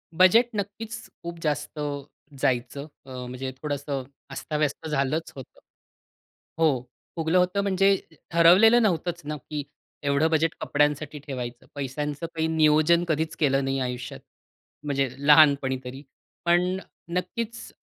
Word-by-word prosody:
Budget 205 +8 +6
नक्कीचं 220 +3 -5
खूप 170 0 -6
जास्त 150 0 -2 0.6
जायचं. 130 +3 -1 0.2
अ, - - -14 0.2
म्हणजे 130 +1 -5
थोडंसं 145 -2 -3 0.3
अस्ताव्यस्त 150 +2 -2
झालंच 150 +2 -1
होतं. 135 - -11 1.0
हो 150 -6 +3 0.3
फुगलं 165 +1 +1
होतं 180 +2 +2
म्हणजे 195 0 +3 0.4
ठरवलेलं 185 +8 +7
नव्हतंच 175 -3 0
ना, 150 +1 -3
की 145 +2 -5 0.4
एवढं 140 +2 +2
बजेट 160 0 +2
कपड्यांसाठी 150 0 0
ठेवायचं. 125 -4 -6
पैशांचं 145 +3 -3
काही 160 0 0
नियोजन 160 +1 +4
कधीच 160 0 -1
केलं 135 -2 +2
नाही 135 0 -1
आयुष्यात. 125 -1 -4 0.6
म्हणजे 140 -2 0 0.2
लहानपणी 145 -3 +6
तरी. 130 +3 -8 0.4
पण 180 +2 +3 0.4
नक्कीच 230 +5 -4
150 Hz, 120 wpm, -26 LUFS, 140-175 Hz, 1.0 s, ठरवलेलं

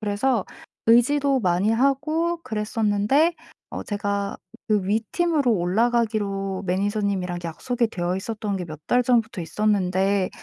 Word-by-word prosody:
그래서 215 +2 0 0.4
의지도 270 +3 +4
많이 185 +2 +2
하고 300 +8 +1
그랬었는데 220 +7 +1 0.4
어 - - -5
제가 200 -1 -2 0.3
그 210 -3 +2
위 215 +3 +2
팀으로 315 -8 +2
올라가기로 200 -1 0
매니저님이랑 195 -1 -1
약속이 235 +8 -1
되어 180 -4 -2
있었던 210 0 -3
게 180 - -4
몇 155 -1 -9
달 245 0 +3
전부터 230 -5 +1
있었는데 195 0 +1
210 Hz, 300 characters per minute, -24 LUFS, 195-245 Hz, 0.4 s, 의지도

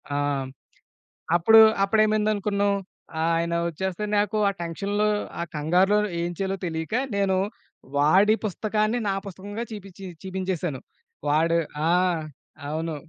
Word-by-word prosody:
ఆహ్, 145 - +1 0.2
హ్మ్, 130 - -6 0.9
అప్పుడు 220 +6 +7 0.2
అప్పుడేమైంది 215 +1 +3
అనుకున్నావు, 200 0 0 0.5
ఆయన 170 +1 +1 0.2
వచ్చేస్తే 190 +4 -4
నాకు 210 +1 +1
ఆ - - 0
టెన్షన్‌లో 200 +5 -1 0.3
ఆ - - 0
కంగారులోని 190 +7 +2
ఏం 170 +1 -2
చేయాలో 195 0 -1
తెలియక, 160 +1 -4 0.2
నేను 195 -1 +2 0.6
వాడి 190 +9 +5
పుస్తకాన్ని 215 +3 0
నా - - +1
పుస్తకంగా 200 +4 -6
చీపిచ్చి 195 -2 -9 0.2
చీపించేసాను. 185 -6 -3 0.5
వాడు 165 +3 +3 0.3
ఆ! - - +4 0.8
అవును. 160 +1 -3
190 Hz, 115 wpm, -25 LUFS, 170-210 Hz, 0.9 s, అప్పుడు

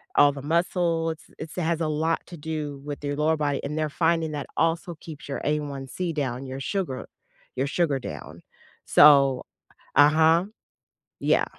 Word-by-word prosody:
all 145 0 +6
the 140 - -7
muscle 170 +1 +1
it's 160 - -10
it's 160 - -7
has 170 -1 0
a 160 - +1
lot 160 +2 0
to 175 - -9
do 150 -2 -5
with 145 0 -6
your 145 0 -2
lower 155 +1 +2
body, 145 -2 -1
and 150 +2 -4
they're 155 -1 0
finding 165 0 +1
that 145 -1 -4
also 165 +1 0
keeps 155 -3 -10
your 140 - -3
A1C 150 +3 -2
down, 135 -3 -3
your 130 +1 -6
sugar 165 -6 -3 0.5
your 130 +2 0
sugar 150 -2 +1
down. 80 - -8 0.4
So 140 -3 +6 0.5
uh-huh. 160 +4 +5 0.7
Yeah. - - +2
150 Hz, 160 wpm, -25 LUFS, 140-165 Hz, 0.7 s, all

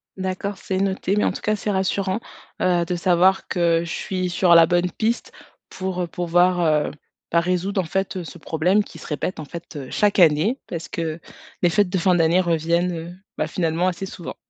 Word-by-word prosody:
D'accord, 190 +1 -3
c'est 190 +1 -3
noté, 195 0 0
mais 210 - +2
en - - +2
tout - - -7
cas, 215 - +1
c'est 210 - -4
rassurant, 190 0 0 0.4
heu, 175 -2 +2
de 180 - -2
savoir 180 +2 +3
que 170 -2 +2
je 170 - -7
suis 185 -1 -2
sur 175 0 +4
la 165 0 +8
bonne 175 +2 +1
piste 230 +5 -2 0.4
pour, 185 -1 -4
heu, 175 - -2
pouvoir, 175 +1 +2
heu, 155 -2 +2 0.4
ben 170 - +4
résoudre 180 +3 0
en - - -5
fait 185 +1 -2
ce 170 - -10
problème 175 +7 +1
qui - - -13
se - - -11
répète, 160 +4 -3
en 155 - -5
fait, 170 +1 -9
chaque 205 -1 +2
année, 175 - +4
parce 165 -1 -5
que, 165 -1 -3 0.4
les 175 - +4
fêtes 195 +3 +2
de 190 - 0
fin 180 +1 +3
d'année 170 +2 +3
reviennent, 170 +1 +1
heu, 165 +1 -7 0.2
bah - - 0
finalement 170 +1 0
assez 185 +2 -5
souvent. 175 - -8
180 Hz, 205 wpm, -22 LUFS, 170-190 Hz, 0.4 s, la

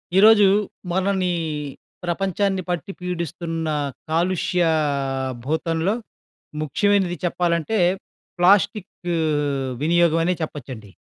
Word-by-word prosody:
ఈరోజు 210 +1 +7 0.5
మనని 190 0 +1 0.7
ప్రపంచాన్ని 190 +2 0
పట్టి 180 +3 -2
పీడిస్తున్న 170 -2 -3 0.4
కాలుష్య 175 +2 +1 0.8
భూతంలో 165 +6 0 0.7
ముఖ్యమైనది 185 +4 +1
చెప్పాలంటే 175 +4 0 0.6
ప్లాస్టిక్ 200 +2 +3 0.9
వినియోగమనే 170 +1 +3
చెప్పొచ్చండి. 130 -8 -6
175 Hz, 65 wpm, -22 LUFS, 165-195 Hz, 0.9 s, ఈరోజు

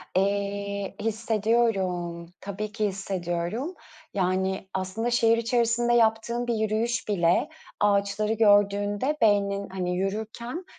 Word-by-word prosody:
Eee, 200 0 -1
hissediyorum. 215 -6 0 0.2
Tabii 205 +2 -5
ki 215 -1 -1
hissediyorum 190 - -3 0.4
yani. 190 0 0
Aslında 190 +5 -2
şehir 230 -1 +4
içerisinde 235 0 +1
yaptığım 235 +1 +2
bir 235 - +1
yürüyüş 220 +3 -1
bile 180 - +2 0.3
ağaçları 205 +1 +2
gördüğünde 205 +5 +3
beynin, 200 -2 +2
hani, 180 -1 -2
yürürken, 220 - -4
205 Hz, 100 wpm, -26 LUFS, 195-230 Hz, 0.4 s, şehir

